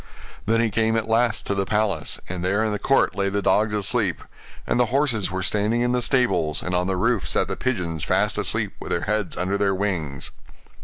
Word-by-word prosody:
Then 115 +1 +3
he 115 -2 +1
came 110 +2 +1
at 110 - -1
last 115 0 +1
to - - -1
the 100 0 0
palace, 100 -8 0
and 90 -1 -5
there 100 +4 +1
in 110 - 0
the 105 - -2
court 135 -8 +2
lay 100 0 0
the 100 +1 -1
dogs 105 +3 +3
asleep; 100 -2 0 0.4
and - - 0
the 125 - +3
horses 125 -5 +1
were 95 0 -3
standing 105 +4 +1
in 120 0 +1
the 125 0 +1
stables; 120 - +1
and 90 - -3
on 90 0 +1
the 95 -1 -1
roof 115 0 +1
sat - - 0
the - - -3
pigeons 90 - -2
fast - - +1
asleep, - - -1
with - - -8
their - - 0
heads 105 -2 -2
under 95 +3 0
their 100 -1 +2
wings. 85 -9 -3
105 Hz, 220 wpm, -23 LUFS, 95-115 Hz, 0.4 s, Then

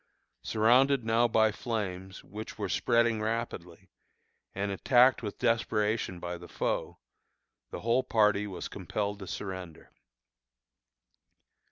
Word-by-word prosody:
Surrounded 125 +4 +3
now 115 +2 +3
by 110 -1 +3
the - - -14
flames, 95 -5 -4
which 110 +2 -8
were - - -2
spreading 115 -2 +2
rapidly, 100 -6 -4 0.7
and 100 +1 -2
attacked 125 +7 +4
with 105 -3 -5
desperation 110 -5 0
by 85 0 -5
the 85 - -11
foe, - - -2 0.7
the - - -7
whole 115 +3 +2
party 105 -4 +2
was 95 -3 -6
compelled 105 -1 -4
to 95 - -8
surrender. 95 -5 -7
110 Hz, 120 wpm, -30 LUFS, 95-115 Hz, 0.7 s, attacked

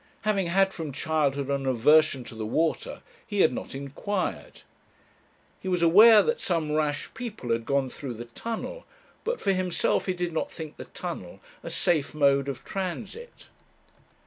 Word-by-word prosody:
Having 200 -4 +1
had, 195 +2 +3
from 160 -4 -5
childhood, 140 -1 0
an 135 -1 -1
aversion 130 +2 +4
to - - -9
the 110 0 -5
water, 160 +8 -1 0.2
he 205 -2 -1
had - - +4
not 125 - -6
inquired. 145 +9 -4 1.0
He - - -8
was 180 -2 +1
aware 210 +6 +8
that 470 0 -1
some 165 -4 0
rash 150 -1 -1
people 220 - -5
had 115 0 -1
gone 140 -1 +1
through 130 -1 -6
the 120 +2 -7
Tunnel, 230 - -6 0.4
but 475 +2 -2
for 195 - +1
himself 185 0 0
he 185 - +1
did 175 -1 -3
not 160 - -2
think 155 -2 -8
the - - -8
Tunnel - - -7 0.2
a - - -7
safe 160 -6 0
mode 140 -2 +3
of 135 - -6
transit. 195 - -6
160 Hz, 165 wpm, -27 LUFS, 140-195 Hz, 1.0 s, aware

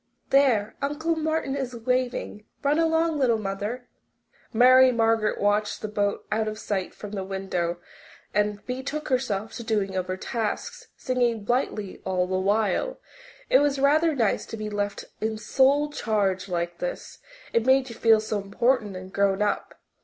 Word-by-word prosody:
There, 240 -7 +3
Uncle 305 +4 -1
Martin 315 -3 -1
is 260 -3 -3
waving. 245 -3 -2 0.2
Run 290 +3 +2
along, 325 -1 +2
little 240 -4 +3
mother." 210 +5 -4 0.6
Mary 255 +2 +7
Margaret 225 -2 +1
watched 205 +1 +1
the - - -1
boat 205 -1 -1
out 215 +1 +1
of 215 0 -4
sight 195 -4 -3
from 210 - -8
the 200 -2 -3
window 190 -3 -2 0.6
and 210 0 +1
then 205 - -26
betook 265 +4 -4
herself 225 -5 -1
to - - -6
the 225 - -11
doing 205 -4 0
of 185 -1 -1
her 185 0 -3
tasks, 225 +2 -4
singing 245 -4 0
blithely 215 -4 -2
all 185 -1 0
the 185 0 -1
while. 210 - 0 0.5
It - - +5
was 285 -1 +2
rather 305 +3 +3
nice 225 -6 +1
to 225 - -6
be 215 0 -5
left 205 -1 -3 0.2
in 220 0 -1
sole 280 +6 +2
charge 200 -7 -1
like 170 -1 -2
this - - -5 0.3
it 230 - +3
made 265 0 +4
you - - -7
feel 225 -1 +5
so 215 -1 -2
important 210 +1 0
and 185 +1 -9
grown 200 0 +2
up. 205 - -2
220 Hz, 170 wpm, -25 LUFS, 200-265 Hz, 0.6 s, Mary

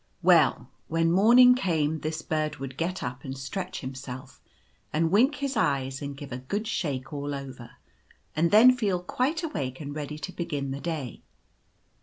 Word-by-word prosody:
Well, - - +4 0.2
when 165 +1 +1
morning 240 +7 +7
came 160 - 0
this 155 +1 -4
bird 155 -1 -1
would 135 -1 -7
get 175 +5 -2
up 125 +2 -5
and 135 -1 -6
stretch 180 +7 -5
himself, 130 -1 -8 0.5
and 160 +1 +1
wink 255 +9 +4
his 280 -1 -3
eyes, 135 - 0
and 140 -1 -5
give 140 -1 -9
a 125 - -4
good 200 - -3
shake 140 - -3
all 145 0 -3
over, 130 -4 -9 0.6
and 170 +2 +2
then 240 +6 +7
feel 200 -7 0
quite 280 - -1
awake 135 - -3
and 145 -2 -6
ready 150 0 -5
to 185 - -6
begin 150 -6 -3
the 135 - -4
day. 155 -8 -4
155 Hz, 170 wpm, -27 LUFS, 135-190 Hz, 0.6 s, morning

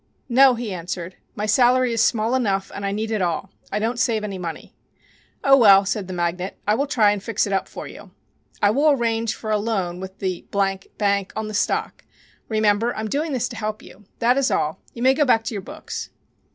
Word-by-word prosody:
"No," 260 +1 +6
he 230 -4 -4
answered. 175 0 -5 0.2
"My 210 - -2
salary 250 +2 +3
is 230 - +1
small 225 0 +1
enough 200 -7 0
and 200 - -6
I - - -1
need 215 +2 -3
it 215 -3 0
all. 180 +2 -2 0.2
I - - -1
don't 225 +3 -1
save 230 -4 +1
any 200 -3 -4
money." 170 -2 -7 0.7
"Oh, 275 0 +7
well," 200 -6 +7
said 200 -1 -2
the 185 - -6
magnate, 175 +2 -2
"I 210 - +4
will 275 +6 0
try 220 -6 +4
and 205 -1 -2
fix 220 +1 0
it 200 - -3
up 195 - 0
for - - -8
you. - - -12 0.5
I 205 - +5
will 285 +7 +3
arrange 230 -4 +1
for 215 - -5
a 210 - +2
loan 195 -5 -2
with 190 +1 -8
the 185 -2 -4
Bank 200 0 -1
on 220 0 -3
the - - -6
stock. 205 - -1 0.5
Remember, 215 +1 +2
I'm 220 0 -3
doing 300 +6 -1
this 250 -2 0
to 235 - -8
help 215 -1 -4
you. 205 +3 -15
That 245 +3 +3
is 270 - +2
all. 150 +1 -1 0.2
You 235 - -5
may 260 +1 +6
go 295 - +2
back 230 -5 +3
to 225 - -4
your 200 - -4
books." - - -7
215 Hz, 220 wpm, -22 LUFS, 195-235 Hz, 0.7 s, Oh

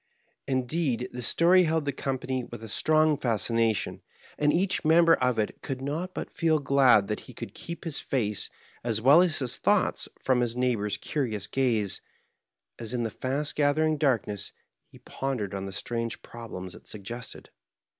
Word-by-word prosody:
Indeed, 130 -1 0
the 125 - -6
story 175 +9 +5
held 160 -1 0
the 140 - 0
company 130 -1 -3
with 120 -1 -9
a - - -6
strong 155 +7 +2
fascination, 115 -2 0 0.3
and 150 0 +2
each 185 +3 +1
member 165 +1 +6
of 125 -2 +1
it 105 -1 -2
could 135 -1 -4
not 155 +7 -4
but - - -5
feel 160 -2 +2
glad 135 -7 +4
that 105 - -2
he - - -11
could - - -7
keep 170 0 -8
his 165 -4 -2
face 105 -6 0 0.3
as 115 -2 0
well 140 +9 +7
as 175 -4 +2
his 130 -3 -1
thoughts - - +1
from 130 -2 +2
his 120 0 -1
neigh 125 0 +2
bor's 105 -2 -2
curious 110 -9 -2
gaze, 115 -6 +1 0.8
as 115 +2 -3
in 120 - 0
the 115 - -2
fast 140 +3 -2
gathering 155 +2 +2
darkness 115 -8 0 0.4
he - - -17
pondered 125 -8 -4
on 95 0 -4
the - - -6
strange 115 +5 -3
problems 95 -6 -8
it - - -15
suggested. 115 +4 -7
130 Hz, 170 wpm, -27 LUFS, 115-150 Hz, 0.8 s, well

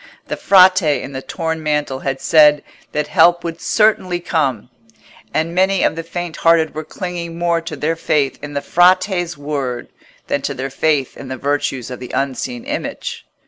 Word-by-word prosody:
The - - -1
Frate 185 0 +6 0.2
in - - -7
the 130 -1 -5
torn 160 +2 -3
mantle 150 -3 -1
had 135 0 -3
said 150 -2 +5 0.3
that 150 0 -1
help 170 +3 +4
would 170 0 -5
certainly 205 -5 +2
come, 135 - -1 0.6
and 160 +2 -1
many 190 +1 +2
of - - +2
the 165 - -3
faint 170 0 -6
hearted 165 -1 +3
were 155 - -5
clinging 170 -1 -6
more 170 -1 +1
to 165 -2 -6
their 155 +3 -1
faith 145 -4 0
in 145 0 -7
the 140 - -2
Frate's 175 -1 +2
word, 140 -4 -4 0.4
than - - -1
to - - -3
their 135 +1 -4
faith 145 -1 0
in 135 - -9
the 130 0 -5
virtues 140 -3 -2
of 125 - -6
the 125 - -8
unseen 140 - -2
Image. 460 - -5
160 Hz, 180 wpm, -18 LUFS, 140-175 Hz, 0.6 s, Frate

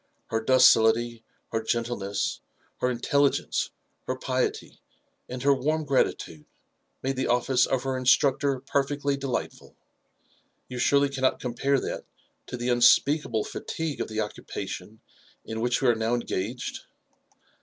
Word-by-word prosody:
Her 110 0 0
docility, 115 -1 +4 0.3
her 115 - 0
gentleness, 110 -3 -2 0.4
her 125 - +1
intelligence, 140 +3 +1 0.4
her 130 - -1
piety, 130 0 -2 0.5
and 125 0 -5
her 140 0 +5
warm 155 +4 -1
gratitude, 105 - -1 0.6
made 135 0 -1
the 130 - 0
office 125 +1 +2
of 130 -2 0
her 135 -1 -1
instructor 135 +1 +3
perfectly 140 +1 0
delightful. 135 -2 -4 0.9
You 125 -1 -6
surely 140 +3 +3
cannot 130 -1 0
compare 135 +3 0
that - - -5 0.4
to - - -5
the 120 +1 -2
unspeakable 120 -1 +4
fatigue 160 -3 -4
of - - -2
the 110 0 -2
occupation 110 +1 -6 0.4
in 110 0 -4
which 120 +2 0
we - - +4
are - - +5
now 110 +2 0
engaged 120 +1 -4
125 Hz, 130 wpm, -26 LUFS, 115-140 Hz, 0.9 s, her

